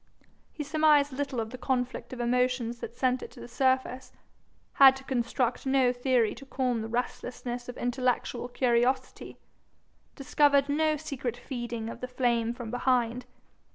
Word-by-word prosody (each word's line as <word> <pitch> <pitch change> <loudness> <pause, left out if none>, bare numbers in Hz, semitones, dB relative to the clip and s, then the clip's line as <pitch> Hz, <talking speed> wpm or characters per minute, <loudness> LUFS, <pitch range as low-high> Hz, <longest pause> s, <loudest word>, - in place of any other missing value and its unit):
He 300 - -5
surmised 295 -2 +3
little 275 -2 -3
of 220 0 -3
the 255 - -8
conflict 255 -1 -2
of 255 - -7
emotions 245 -1 0
that 235 - -7
sent 255 0 +1
it - - -7
to - - -13
the - - -9
surface, 260 0 0 0.6
had 270 -1 +8
to 270 - -10
construct 250 0 -1
no 265 -2 +3
theory 245 -3 +1
to 275 +4 -12
calm 250 -4 -1
the 220 - -4
restlessness 245 +1 -4
of 245 - -7
intellectual 245 0 -1
curiosity, 250 +1 0 0.8
discovered 280 0 +3
no 310 +1 +2
secret 270 -5 -4
feeding 240 -3 -5
of 230 - -8
the 250 - -3
flame 240 -2 0
from 240 -2 -7
behind. 245 -1 0
250 Hz, 155 wpm, -28 LUFS, 240-265 Hz, 0.8 s, had